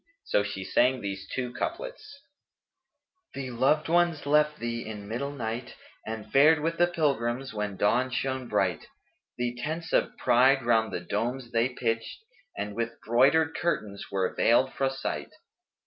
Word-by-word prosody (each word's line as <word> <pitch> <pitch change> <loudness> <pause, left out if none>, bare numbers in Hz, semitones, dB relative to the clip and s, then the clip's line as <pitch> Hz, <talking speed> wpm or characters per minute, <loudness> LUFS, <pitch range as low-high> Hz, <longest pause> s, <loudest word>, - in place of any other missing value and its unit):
So 450 +3 +2
she - - -4
sang 130 +1 +2
these 100 -1 -5
two 125 -2 -3
couplets, 340 - -5 1.1
"The 130 -2 -4
loved 135 +6 +2
ones 170 -2 +2
left 150 +1 +3
thee 115 -1 -3
in 105 -2 -7
middle 125 +6 -3
night, 120 -2 -5 0.2
* - - -24
And 110 -1 -6
fared 150 +3 +6
with 165 +2 -2
the 175 - +5
pilgrims 135 -7 -1
when 105 -2 -3
dawn 120 +6 +2
shone 130 0 -2
bright: - - 0 0.5
The 120 0 -1
tents 160 +3 -4
of - - +1
pride 130 +2 +4
round 110 -2 +3
the 90 - -3
domes 120 +7 -3
they 115 +2 +2
pitched, 115 - -3 0.2
* 280 - -28
And 105 0 -3
with 115 0 -3
broidered 140 +7 +4
curtains 105 -12 -2
were 95 -1 0
veiled 130 +3 +3
fro' 135 -1 +1
sight." 135 0 -4
130 Hz, 160 wpm, -28 LUFS, 115-150 Hz, 1.1 s, fared